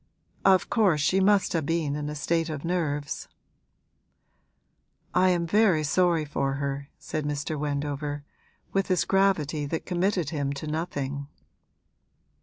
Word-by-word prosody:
'Of 190 -1 +5
course 195 -9 +3
she 185 +6 +3
must 200 0 +3
have 160 -4 0
been 165 -4 0
in 150 0 -3
a 150 - -5
state 165 +3 0
of 155 0 -5
nerves.' 150 -5 -2 1.9
'I 185 +1 +4
am 175 -2 +1
very 190 -4 +3
sorry 165 +1 +2
for 140 -2 -1
her,' 140 0 -3
said 155 -1 -4
Mr. 150 +1 -2
Wendover, 145 0 -3 0.5
with 195 -1 +1
his 185 -2 +2
gravity 165 -7 +2
that 160 +2 -3
committed 180 -3 0
him 140 -3 -1
to 140 +2 -6
nothing. 145 -3 -3
155 Hz, 135 wpm, -27 LUFS, 145-180 Hz, 1.9 s, Of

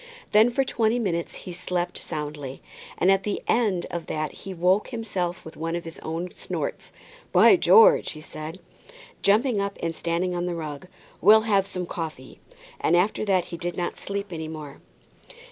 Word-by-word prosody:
Then 215 +3 +6
for 270 +3 +1
twenty 230 -2 +1
minutes 175 -8 -2
he 180 - -6
slept 175 0 -2
soundly, 150 -4 -5 0.4
and 185 - +4
at 195 0 +3
the 205 +1 -2
end 210 -7 +2
of 170 -1 -4
that 155 -1 -2
he 195 - -9
woke 185 +3 +2
himself 195 -7 -3
with 160 - -10
one 165 +2 -3
of 170 - -3
his 165 - -8
own 165 +3 -4
snorts. - - -5 0.4
"By - - +7
George!" 470 +2 +6
he 155 - -10
said, 155 +3 -8 0.6
jumping 215 +3 +3
up 200 0 -3
and 165 -1 -2
standing 170 +2 -1
on 175 0 -1
the 175 - -2
rug, 155 0 -6 0.3
"we'll 215 +3 +8
have 200 -3 +2
some 180 -2 -4
coffee;" 155 -7 -6 0.4
and 170 - +3
after 195 +5 +1
that 190 -3 +2
he - - -3
did 175 +1 -4
not 175 -1 -3
sleep 200 -1 -4
any 160 -1 -4
more. 150 -3 -8
180 Hz, 180 wpm, -25 LUFS, 165-200 Hz, 0.6 s, we'll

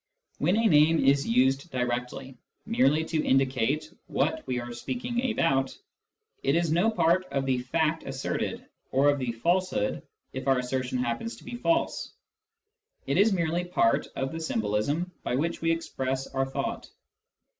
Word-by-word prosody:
When 175 +8 +2
a 230 - +2
name 155 -4 +5
is 140 +1 +3
used 130 +6 +2
directly, 125 +1 -3 0.3
merely 160 - +2
to 160 -1 -1
indicate 135 +4 +1
what 320 - 0
we 125 -1 -1
are 120 0 -6
speaking 245 - -2
about, 135 -10 +1 0.6
it 135 - +2
is 170 -2 +1
no 175 +7 +3
part 185 -3 +2
of 135 -2 -2
the/act 135 +5 0
asserted, - - -3 0.2
or 140 +2 +4
of 145 - -2
the 125 -2 -1
falsehood 170 - 0 0.3
if 130 +1 -5
our 135 -1 +4
assertion 130 0 -2
happens 125 - -2
to - - -16
be 245 - -8
false: 330 +7 0 0.9
it - - +1
is 215 +2 +5
merely 170 -2 0
part 175 -10 +2
of 135 0 -2
the 165 - -5
symbolism 140 - -1
by - - -2
which 165 +5 -1
we 165 - +1
express 135 -5 -2
our 135 0 -2
thought. 135 - -4
140 Hz, 155 wpm, -27 LUFS, 130-170 Hz, 0.9 s, name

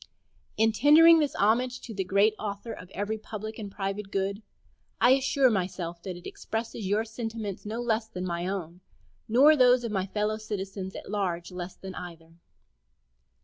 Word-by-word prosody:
In 225 +1 +4
tendering 320 +7 +7
this 295 -3 0
homage 245 +5 +2
to 230 - -8
the 195 -2 -2
Great 200 +3 +3
Author 205 +2 -5
of 180 - -11
every 205 +3 -3
public 215 +1 -7
and 205 -2 -6
private 195 0 -4
good, 195 +1 -2 0.6
I 245 - +6
assure 270 -1 +4
myself 180 -3 -3
that 185 -1 -6
it 175 - -14
expresses 225 -2 -5
your 210 +3 +1
sentiments 225 -3 -5
not 230 +3 -3
less 220 -1 0
than 185 -4 -5
my 175 0 -2
own, 180 -2 -5 0.5
nor 275 +7 +6
those 250 -2 +5
of 230 - -3
my 190 -2 -1
fellow 210 +2 -1
citizens 195 -3 -5
at - - -8
large 180 -4 -2
less 180 0 -6
than 190 -1 -9
either. 165 -2 -9
210 Hz, 170 wpm, -28 LUFS, 190-225 Hz, 0.6 s, tendering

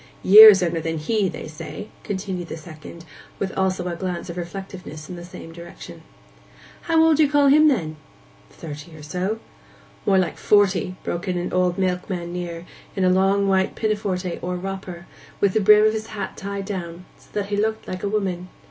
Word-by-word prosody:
'Years 205 -1 +10
younger 170 -1 -1
than 165 +1 -3
he, 195 +5 0
they 160 - -7
say,' 165 +7 -8
continued 190 -3 -4
the - - -6
second, 160 +1 -11 0.3
with 195 -1 -4
also 185 -1 0
a 175 - -3
glance 180 -1 -4
of 170 - -9
reflectiveness 175 -3 -7
in 180 - -7
the 175 - -9
same 165 -2 -11
direction. 170 +1 -11 0.8
'How 325 -1 +3
old 320 -2 +4
do 310 - +5
you 290 - +2
call 290 -1 +4
him, 305 +2 +6
then?' 165 - 0 0.5
'Thirty 155 +1 -10
or 150 - -12
so.' 185 +7 -2 0.7
'More 195 -1 +4
like 185 -3 0
forty,' 195 -3 +2
broke 175 +3 -4
in 180 -1 -1
an 175 - -3
old 180 0 +1
milkman 180 -2 -2
near, 175 -1 -5 0.3
in 190 - 0
a 185 - +4
long 195 +2 +2
white 190 -1 +1
pinafore 210 -3 -1 0.2
or 180 +1 -3
'wropper,' 190 +1 -5
and 170 0 -11 0.3
with 200 -2 +2
the 220 - +2
brim 210 +1 +6
of 215 - +3
his 220 0 -4
hat 215 - -6
tied 200 0 -5
down, 180 -3 -6
so - - -22
that 205 -1 -3
he 205 - -1
looked 220 +1 -1
like 185 - -5
a 200 - -2
woman. 190 -4 -2
185 Hz, 195 wpm, -22 LUFS, 175-205 Hz, 0.8 s, Years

